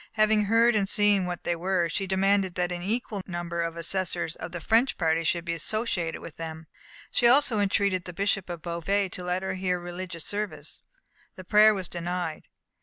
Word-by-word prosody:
Having 215 -1 +3
heard 230 +2 +4
and 195 -2 +1
seen 205 -3 +3
what 175 -1 -5
they 175 - 0
were, 175 0 0
she 190 +4 -2
demanded 190 -1 +2
that 180 0 0
an 175 0 -3
equal 210 +1 -2
number 175 -1 -3
of 165 0 -3
assessors 175 -1 -2
of - - -7
the 175 - -5
French 230 +9 +2
party 165 -1 +1
should 170 +1 0
be 170 - -1
associated 175 -1 -1
with 160 - -10
them. 160 -1 -7 0.5
She 240 - +3
also 250 -3 +5
entreated 200 -2 +1
the 180 - -6
Bishop 195 0 -1
of 170 -3 -6
Beauvais 185 +4 -1
to 180 - -6
let 180 +1 -1
her 190 0 -2
hear 185 -1 -1
religious 175 -1 -6
service. 210 0 -5 0.5
The 185 - -9
prayer 210 +3 +6
was 190 -3 -4
denied. 175 -2 -4
185 Hz, 190 wpm, -27 LUFS, 170-205 Hz, 0.5 s, prayer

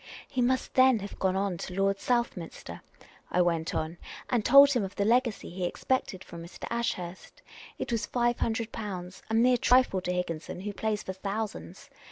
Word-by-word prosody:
" - - -18
He 255 - +2
must 255 +1 +1
then 260 -2 +6
have 200 -1 -8
gone 190 -1 0
to 180 - -6
Lord 195 0 +1
Southminster," 235 -9 -2 0.5
I 180 - +3
went 165 -2 -1
on, 160 +2 -3 0.3
and 240 -3 +2
told 280 +3 +8
him 245 -5 +1
of 195 0 -6
the 200 - 0
legacy 235 -3 +1
he 180 +1 -5
expected 190 -1 -1
from 170 -1 -9
Mr. 170 - -9
Ashurst. 185 -7 -4 0.3
It - - -4
was 230 -2 -1
five 240 -1 +1
hundred 225 0 -1
pounds 185 -4 -6
— - - -28
a 220 - 0
mere 245 +2 +5
trifle 245 -6 +3
to 180 - -2
Higginson, 180 -1 -3
who 205 +1 -4
plays 215 0 -2
for 190 - -5
thousands. 205 +3 -5
205 Hz, 190 wpm, -29 LUFS, 180-240 Hz, 0.5 s, told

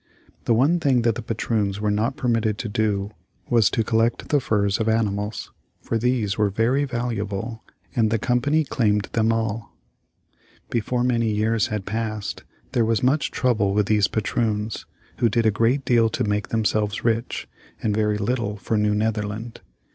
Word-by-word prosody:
The 115 - +3
one 145 +9 +3
thing 130 -6 +2
that 115 -1 +3
the 120 - -5
patroons 105 -3 -1
were 105 0 0
not 110 +6 0
permitted 115 -4 0
to 115 - -4
do 105 -1 -1 0.4
was 115 -4 +5
to 115 - 0
collect 115 +1 0
the 145 - +3
furs 105 -4 +1
of 110 0 +1
animals, 105 -1 -1 0.3
for 115 - -2
these 115 -4 0
were 105 -1 +3
very 120 +8 +1
valuable 115 -3 -3 0.3
and 110 -2 +3
the 115 - +1
Company 125 +7 +1
claimed 105 -7 +1
them 115 0 +2
all. 110 -1 -3 0.9
Before 120 +2 0
many 115 -2 +1
years 110 0 +1
had 105 -3 -4
passed 110 -1 -3 0.3
there 125 -3 +2
was 115 0 +1
much 140 +3 +2
trouble 105 -6 +1
with 105 -1 +3
these 105 -1 +3
patroons, 110 0 -2 0.3
who 120 - +3
did 115 +1 +1
a 110 - +5
great 115 +6 +1
deal 115 -2 +4
to - - -2
make 105 -1 -1
themselves 110 -2 0
rich, 115 +1 -1 0.4
and 105 - +1
very 105 0 +1
little 105 0 -1
for 105 +2 -1
New 105 0 +2
Netherland. 110 +1 -2
110 Hz, 170 wpm, -23 LUFS, 105-120 Hz, 0.9 s, was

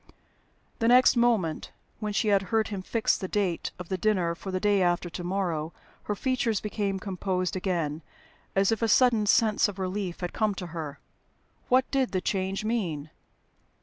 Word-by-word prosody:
The 230 - +2
next 250 +2 +6
moment 225 -10 +1 0.3
(when 210 -1 -3
she 210 +1 +1
had 200 -1 +4
heard 220 -1 +1
him 200 -3 -4
fix 225 +4 +1
the 190 - -4
date 185 -4 -1
of 180 -2 -8
the 190 - -2
dinner 185 -4 +1
for 190 - -8
"the 185 0 -1
day 205 0 +2
after 175 -1 +1
to 175 - -6
morrow") 175 -4 -2 0.3
her 210 - -1
features 240 -3 0
became 200 -2 -2
composed 185 -2 -2
again, 170 -5 -2 0.5
as 195 +2 +3
if 225 - -1
a 230 - +2
sudden 225 -2 +4
sense 215 0 +4
of 200 -2 -7
relief 190 -1 -3
had 180 - -3
come 215 -2 0
to 185 - -5
her. 150 -4 -5 0.7
What 255 +1 +4
did 265 -4 +1
the 185 - 0
change 195 +2 -2
mean? 170 -10 -2
195 Hz, 180 wpm, -27 LUFS, 180-215 Hz, 0.7 s, next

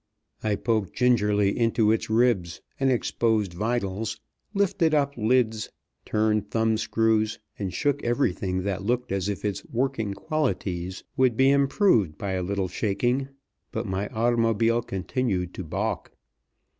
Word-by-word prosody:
I 105 -1 +1
poked 110 -2 -1
gingerly 105 -5 +3
into 115 -2 +2
its 110 - 0
ribs 110 -7 +2 0.2
and 135 -1 +3
exposed 110 -5 +1
vitals; 105 +1 -2 0.3
lifted 195 -6 +2
up 140 -1 +1
lids; 110 -2 +1 0.4
turned 105 -1 +1
thumb 110 -1 +1
screws, 110 0 +1 0.2
and 100 -3 -2
shook 145 +5 0
everything 95 -7 0
that 95 -1 -2
looked 125 +2 -1
as 95 0 -1
if 100 +1 -4
its 100 -2 -2
working 120 -5 -1
qualities 95 - -2
would 130 -3 +3
be 135 +1 +5
improved 140 - +3
by 100 - -3
a 95 -1 -1
little 95 +1 -1
shaking, 120 +8 0 0.4
but 110 +2 -3
my 95 0 -2
automobile 115 0 +2
continued 95 -3 -2
to 95 - -5
balk. 80 - -3
110 Hz, 135 wpm, -26 LUFS, 100-125 Hz, 0.4 s, be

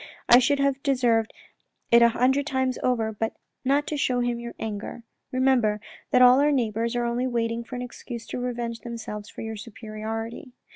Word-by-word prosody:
I 240 - +9
should 285 +3 +2
have 275 -1 +1
deserved 240 -5 +2 0.6
it 235 0 +7
a 235 - +7
hundred 265 +4 +2
times 260 -2 0
over, 230 -3 +1
but 225 +2 -2 0.3
not 280 +2 +2
to 300 - -3
show 255 -3 +1
him 240 -1 -1
your 235 0 -7
anger. 215 +2 -5 0.3
Remember 255 -5 +2 0.3
that 250 - +5
all 250 +1 +8
our 295 +1 +4
neighbours 230 -2 0
are 240 0 0
only 240 +2 0
waiting 230 -1 -1
for 250 - -8
an 250 - -4
excuse 240 -1 -8
to - - -4
revenge 240 -2 -3
themselves 220 -3 -7
for - - -9
your 220 -1 -5
superiority. 225 +2 -6
240 Hz, 185 wpm, -25 LUFS, 225-255 Hz, 0.6 s, I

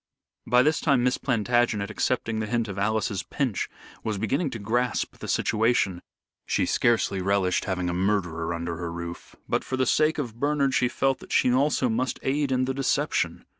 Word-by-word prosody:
By 125 +1 +5
this 155 +3 +2
time 140 -5 +2
Miss 125 0 +1
Plantagenet, 120 -3 +1
accepting 115 -1 -1
the 110 - -2
hint 115 0 0
of 100 -1 -5
Alice's 105 -1 0
pinch, 125 -1 -2 0.3
was 110 -2 -2
beginning 135 - 0
to 115 - -5
grasp 120 +4 -1
the - - -8
situation. 110 -5 +1 0.5
She - - +1
scarcely 110 -5 +1
relished 95 -1 +1
having 90 -2 -1
a 90 - -1
murderer 90 -3 0
under 85 0 -3
her 85 -1 -4
roof, 85 0 -7
but - - 0
for 130 - -3
the 130 - +2
sake 155 +5 +2
of 120 -6 -4
Bernard 140 -1 +1
she 125 - +3
felt 135 +2 0
that - - -13
she 125 - +3
also 135 0 +2
must 125 +3 -1
aid 140 +1 0
in 130 0 +2
the 135 - -1
deception. 135 0 0
115 Hz, 185 wpm, -26 LUFS, 100-130 Hz, 0.5 s, By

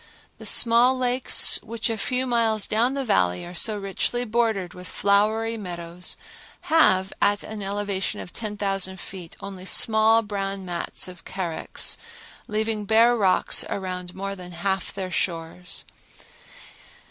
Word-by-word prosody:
The - - -5
small 240 +2 +6
lakes 250 0 +3
which 230 0 -4
a 225 - -1
few 250 +4 -1
miles 230 -4 +2
down 240 +5 +1
the 275 -1 -2
Valley 90 - +1
are 175 - -9
so 210 +4 +1
richly 205 +5 -2
bordered 220 -5 0
with 180 0 -10
flowery 220 +3 +1
meadows 175 -3 -5 0.6
have 190 -12 +4
at 205 0 +2
an 215 -1 -7
elevation 200 -1 -2
of 180 - -9
10,000 195 -3 -2
feet 180 -3 -10
only 195 -2 -8
small 220 +2 +5
brown 195 -2 -4
mats 175 +1 -2
of 180 -2 -11
carex, 180 -4 -2 0.5
leaving 215 0 -2
bare 230 +3 +5
rocks 195 -5 +3
around 180 -2 -5
more 195 +1 -4
than 180 -2 -10
half 190 +2 -2
their 190 -2 -5
shores. 175 0 -3
200 Hz, 135 wpm, -24 LUFS, 185-225 Hz, 0.6 s, small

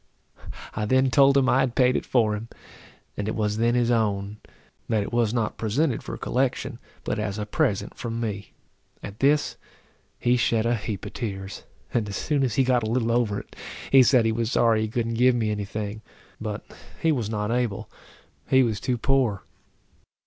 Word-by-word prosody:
I 105 - -2
then 130 +3 +3
told 140 +2 +5
him 135 -1 +3
I 130 - +4
had 130 -3 0
paid 125 -1 +4
it - - -2
for 110 -4 +2
him, 110 +2 -7 0.7
and 105 - -3
it 110 - -2
was 105 -1 -1
then 120 +1 +2
his 120 -1 +2
own; 105 -3 0 0.5
that 110 -3 +2
it 100 - -7
was 120 -3 +2
not 115 -2 -2
presented 120 +4 0
for - - -6
collection, 130 -1 -1 0.2
but 105 - -2
as 105 -1 -2
a 105 - -3
present 105 -1 0
from 115 -1 -4
me. 105 -3 -4 0.5
At 100 +1 -8
this, 145 +2 +2 0.6
he 120 +1 +2
shed 115 -1 +1
a 120 - +2
heap 105 -3 -4
of - - -8
tears; 95 -4 -5 0.3
and 110 -3 0
as 100 - -5
soon 150 -2 0
as 120 -5 0
he 135 - +4
got 125 -1 +2
a 110 - -2
little 115 0 +1
over 115 -4 +1
it, - - -20 0.4
he 135 - +8
said 125 -2 +4
he 115 - +2
was 115 +1 -1
sorry 115 -2 +3
he 110 - 0
couldn't 115 +1 -2
give 125 0 +5
me 110 -3 0
any 105 -1 -2
thing, 105 +1 -5 0.4
but 105 0 -5 0.3
he 165 - +2
was 120 -8 -1
not 105 0 -2
able, 120 -4 -1 0.6
he 130 0 +5
was 110 -5 -1
too 125 -1 -1
poor. 125 -5 +1
115 Hz, 200 wpm, -25 LUFS, 105-125 Hz, 0.7 s, he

